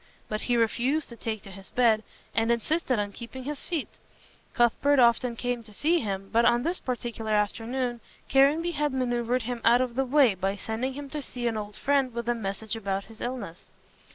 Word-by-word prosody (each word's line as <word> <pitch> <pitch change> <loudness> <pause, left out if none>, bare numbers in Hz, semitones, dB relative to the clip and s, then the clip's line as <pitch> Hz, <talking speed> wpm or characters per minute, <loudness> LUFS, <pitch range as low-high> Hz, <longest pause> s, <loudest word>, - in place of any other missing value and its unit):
But 215 0 -2
he 245 -1 +1
refused 250 +6 +1
to 235 - -8
take 220 -2 -4
to 195 - -11
his 195 0 -11
bed, 230 -3 +3 0.3
and 225 +1 +2
insisted 255 +3 +1
on 205 -1 -1
keeping 240 +4 -8
his 290 +1 -5
feet. 330 -6 -4 0.6
Cuthbert 260 +4 +3
often 235 0 +4
came 245 0 -2
to 215 -2 -13
see 335 +8 +2
him, 195 -5 -3
but 230 +1 +5
on 240 0 +4
this 345 +4 0
particular 235 -3 -3
afternoon 235 +4 0 0.3
Caranby 290 +6 +4
had 295 -3 0
manoeuvred 245 -1 0
him 240 0 -4
out 235 +2 +6
of 255 -2 0
the 265 +2 +1
way 265 -4 +5
by 195 +1 -1
sending 225 +6 -3
him 285 +1 -6
to 300 - -3
see 245 -2 -6
an 230 -1 +1
old 210 -1 -5
friend 270 +1 +1
with 235 0 -3
a 240 - +3
message 220 0 -4
about 200 -3 -2
his 225 +1 -15
illness. 235 -9 -5
240 Hz, 200 wpm, -27 LUFS, 220-260 Hz, 0.6 s, out